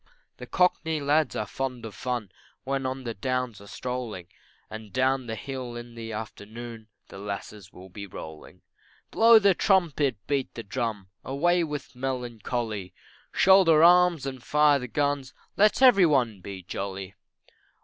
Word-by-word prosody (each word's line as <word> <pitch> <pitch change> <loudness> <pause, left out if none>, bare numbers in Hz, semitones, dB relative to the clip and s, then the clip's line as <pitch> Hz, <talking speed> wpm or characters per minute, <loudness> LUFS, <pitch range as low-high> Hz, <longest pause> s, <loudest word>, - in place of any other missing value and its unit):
The 125 - -9
Cockney 160 -2 +1
lads 150 +2 +1
are 105 - -2
fond 125 +1 -4
of 110 - -7
fun, 120 -6 -4 0.3
When 135 0 -2
on 130 0 -4
the 115 -2 -4
downs 125 0 -3
are 100 - -13
strolling, 120 -8 -5 0.4
And 110 -1 -9
down 130 +1 +1
the 110 - -3
hill 130 -1 -6
in 120 0 -8
the 115 -1 -7
afternoon 110 +1 -8 0.2
The 95 - -10
lasses 100 -1 -7
will 95 +1 -13
be 100 +2 -8
rolling. 80 -3 -11 0.5
Blow 230 0 +7
the 200 -3 +5
trumpet, 160 - +2
beat 140 -2 -2
the 115 - -6
drum, 110 -4 -4
Away 175 +6 +1
with 150 -4 -6
melancholy, 120 -6 -4 0.4
Shoulder 185 -5 +6
arms 175 -4 +5
and 130 -2 -5
fire 150 0 +4
the 125 - -6
guns, 145 0 -1 0.2
Let 210 +5 +3
every 200 -9 +7
one 120 -9 +1
be 95 0 -8
jolly. 95 +1 -5
125 Hz, 150 wpm, -26 LUFS, 110-145 Hz, 0.5 s, Blow